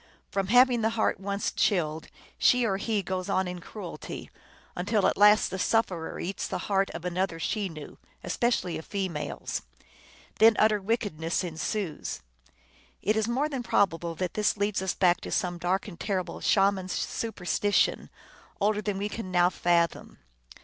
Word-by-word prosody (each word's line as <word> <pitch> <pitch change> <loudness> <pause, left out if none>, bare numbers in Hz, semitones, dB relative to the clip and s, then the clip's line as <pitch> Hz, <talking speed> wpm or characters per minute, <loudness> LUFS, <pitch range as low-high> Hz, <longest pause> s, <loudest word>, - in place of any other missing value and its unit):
From 195 -1 -1
having 245 +1 +5
the 220 - +2
heart 220 - +1
once 200 +1 -2
chilled, 160 -5 0 0.3
she 250 -1 +4
or 195 -4 +1
he 205 0 -1
goes 185 +1 -3
on 190 -1 +1
in 180 0 -6
cruelty, 180 -7 -8 0.4
until 205 +3 +1
at - - +3
last 210 +1 +5
the 190 - -4
sufferer 185 -7 0
eats 195 +3 -3
the - - -3
heart 195 0 +2
of 170 - -6
another 180 -1 -1
Chenoo, 165 -4 -4 0.3
especially 235 -9 0
a - - -6
female 180 -5 -4
s. - - -3 0.8
Then 225 0 +7
utter 215 -1 +3
wickedness 190 -6 -1
ensues. 175 +1 -3 0.8
It 215 +3 +2
is 220 0 +1
more 260 +5 +1
than 275 -4 -4
probable 170 -7 +1
that 180 +1 -3
this 210 0 +1
leads 205 -1 0
us 190 -2 -1
back 180 -2 +3
to - - -6
some 175 -1 -1
dark 185 +4 0
and 180 -5 -10
terrible 190 -3 -3
Shaman 195 -2 +2
superstition, 205 +1 0 0.5
older 210 +1 +1
than 205 -2 -2
we 200 +1 -1
can 210 -2 -6
now 180 0 +3
fathom. 170 -2 0
195 Hz, 160 wpm, -28 LUFS, 175-210 Hz, 0.8 s, Then